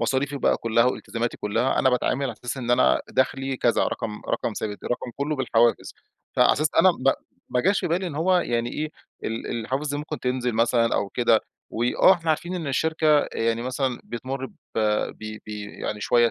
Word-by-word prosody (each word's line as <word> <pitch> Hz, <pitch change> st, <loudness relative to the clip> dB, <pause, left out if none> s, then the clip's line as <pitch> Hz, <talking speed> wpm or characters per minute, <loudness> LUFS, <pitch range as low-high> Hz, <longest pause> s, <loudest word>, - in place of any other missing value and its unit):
مصاريفي 140 Hz, +2 st, 0 dB
بقى -, -, +2 dB
كلّها، 115 Hz, 0 st, +2 dB
والتزاماتي 120 Hz, -1 st, -2 dB
كلّها 115 Hz, +6 st, 0 dB
أنا 130 Hz, -, +4 dB
باتعامل 125 Hz, +2 st, 0 dB
على 130 Hz, -, -2 dB
أساس 125 Hz, +3 st, -6 dB
إن 120 Hz, -2 st, -3 dB
أنا 65 Hz, -, +4 dB
دخلي 135 Hz, 0 st, 0 dB
كذا، 120 Hz, -1 st, +2 dB
رقم 105 Hz, -1 st, -4 dB
رقم -, -, -1 dB
ثابت، 105 Hz, -1 st, -5 dB
رقم 120 Hz, 0 st, -3 dB
كلّه 150 Hz, +2 st, -1 dB
بالحوافز. 120 Hz, -3 st, +2 dB, 0.4 s
فعلى -, -, +6 dB
أساس 155 Hz, +2 st, +1 dB
أنا 185 Hz, -, +7 dB
ب 135 Hz, -5 st, +2 dB, 0.4 s
ما 125 Hz, -, +1 dB
جاش 195 Hz, +6 st, +2 dB
في -, -, -2 dB
بالي 180 Hz, +3 st, 0 dB
إن 165 Hz, -, -5 dB
هو 180 Hz, +5 st, +3 dB
يعني 120 Hz, -6 st, -1 dB
إيه، 155 Hz, 0 st, -3 dB, 0.3 s
ال 115 Hz, +1 st, -3 dB
الحوافز 130 Hz, +6 st, -2 dB
دي 145 Hz, -, -1 dB
ممكن 150 Hz, +1 st, -5 dB
تنزل 125 Hz, -1 st, -1 dB
مثلًا 115 Hz, +1 st, +2 dB
أو 100 Hz, -, 0 dB
كده. 115 Hz, -1 st, +3 dB, 0.3 s
وآه 120 Hz, +10 st, +4 dB
إحنا 165 Hz, -3 st, 0 dB
عارفين 175 Hz, +3 st, -1 dB
إن 170 Hz, -4 st, -4 dB
الشركة 155 Hz, +1 st, +2 dB
يعني 115 Hz, 0 st, 0 dB
مثلًا 130 Hz, 0 st, -2 dB
بتمُر 130 Hz, +3 st, -5 dB
ب -, -, -16 dB, 0.3 s
ب 110 Hz, 0 st, -1 dB
ب -, -, -14 dB
يعني 105 Hz, 0 st, -5 dB
شويّة 120 Hz, +2 st, +3 dB
125 Hz, 190 wpm, -24 LUFS, 115-145 Hz, 0.4 s, أنا